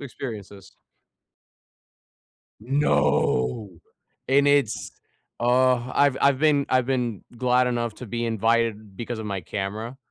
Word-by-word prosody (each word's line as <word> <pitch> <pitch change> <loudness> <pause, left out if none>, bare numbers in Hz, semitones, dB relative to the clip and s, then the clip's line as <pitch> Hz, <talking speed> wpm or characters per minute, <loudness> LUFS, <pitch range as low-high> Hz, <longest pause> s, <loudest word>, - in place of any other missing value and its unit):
Experiences. 105 -8 -8 1.9
No, 110 - +1 0.6
and 140 +1 +4
it's, 145 -6 +1 0.5
uh, 125 0 +2
I've 140 -2 +3
I've 140 -1 +3
been 145 -2 +3
I've 130 -1 +2
been 125 -6 -2
glad 125 +1 +2
enough 120 -2 -2
to 125 - -9
be 120 +2 -3
invited 115 -2 0
because 120 +1 -5
of 110 - -5
my 100 -2 -3
camera, 105 +7 -5
120 Hz, 115 wpm, -24 LUFS, 110-130 Hz, 1.9 s, and